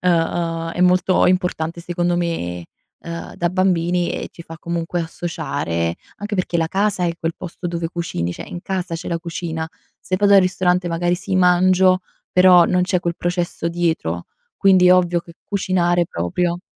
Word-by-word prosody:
uhm, 165 -1 0
è 175 - -4
molto 180 +1 +4
importante 180 -2 0
secondo 175 0 -1
me, 90 - -2 0.4
uhm 170 0 -7
da 175 - 0
bambini 180 -1 +1
e - - -4
ci - - -14
fa 165 0 -10
comunque 170 +1 -3
associare 135 - -3 0.2
anche 205 +1 -4
perché 180 -2 -1
la 165 -1 0
casa 195 -1 0
è 170 - +1
quel 165 0 -2
posto 180 0 -7
dove 170 -1 -2
cucini, 160 - -3
cioè - - -8
in 175 - -6
casa 185 -2 -3
c'è 165 - -6
la 170 -1 -1
cucina, 165 -1 -4 0.3
se 185 - -2
vado 200 +1 +3
al 195 - +8
ristorante 180 -1 +1
magari 175 +1 0
sì, 190 +1 -3
mangio, 185 +1 +4 0.3
però, 180 -1 +7
non 180 +1 +2
c'è 180 0 +1
quel 170 -1 -2
processo 175 -1 -2
dietro. 160 - -1 0.3
Quindi 185 -2 +5
è 180 - +8
ovvio 175 -1 +2
che 170 - -15
cucinare 175 -3 +1
proprio 170 - -2
175 Hz, 170 wpm, -20 LUFS, 165-180 Hz, 0.4 s, al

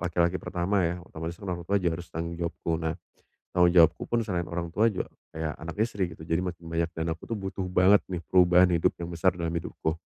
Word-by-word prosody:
laki-laki 85 0 +1
pertama 90 +1 0
ya, 85 +1 -1
otomatis 80 +1 -6
orang 90 -3 -4
tua 100 +2 +2
juga 85 -3 0
harus 90 - -11
tanggung 85 +1 -4
jawabku. 85 -1 -2
Nah, 80 -1 -1 0.6
tanggung 90 -1 +5
jawabku 85 -2 +6
pun 120 0 +1
selain 90 -4 -2
orang 85 0 -3
tua 110 +5 +3
juga - - -3 0.3
kayak 80 -1 -2
anak, 80 +1 -6
istri, 100 -4 -1
gitu. 80 - -14
Jadi, 80 0 0
makin 90 -2 -5
banyak 85 0 0
dan 80 0 -2
aku 80 - -6
tuh - - -3
butuh 95 -1 -4
banget 90 +3 +6
nih 90 -2 -4
perubahan 90 0 +6
hidup 80 - +2
yang 85 - -4
besar 90 +2 +2
dalam 85 -1 -2
hidupku. 80 0 -3
85 Hz, 220 wpm, -28 LUFS, 85-90 Hz, 0.6 s, jawabku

